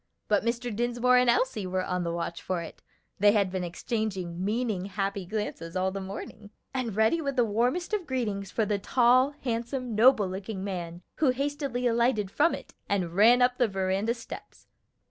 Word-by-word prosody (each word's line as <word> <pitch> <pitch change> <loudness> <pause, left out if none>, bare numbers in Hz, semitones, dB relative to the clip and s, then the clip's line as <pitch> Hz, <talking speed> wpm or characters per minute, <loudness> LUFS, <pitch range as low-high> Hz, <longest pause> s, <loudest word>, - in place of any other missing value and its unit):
But 210 -1 +2
Mr. 235 -1 -2
Dinsmore 240 +2 +2
and 250 -1 +4
Elsie 235 -5 +1
were 185 0 -1
on 180 -1 -1
the 170 - -2
watch 170 0 -4
for 180 -2 -2
it 160 - -11 0.4
(they 205 +1 +6
had 200 -4 +2
been 185 -1 -2
exchanging 185 -1 -3
meaning, 210 -2 -1
happy 195 -1 -3
glances 190 -5 -4
all 185 +1 +1
the 195 0 -5
morning), 205 +2 -8 0.2
and 245 -6 -2
ready 220 +10 +3
with 280 -3 -2
the 245 -2 +3
warmest 245 - 0
of 390 -6 -1
greetings 210 -7 -2
for 220 - 0
the 205 0 0
tall, 255 +6 +3
handsome, 240 0 -2
noble 220 -2 +5
looking 190 +1 -5
man 175 -3 -5
who 300 - +3
hastily 275 -1 -2
alighted 230 -4 +2
from 310 +8 +3
it - - -12 0.2
and 185 -4 0
ran 235 +5 +6
up 250 +1 +2
the 245 - +4
veranda 195 +3 0
steps. 230 - -10
215 Hz, 185 wpm, -28 LUFS, 190-245 Hz, 0.4 s, they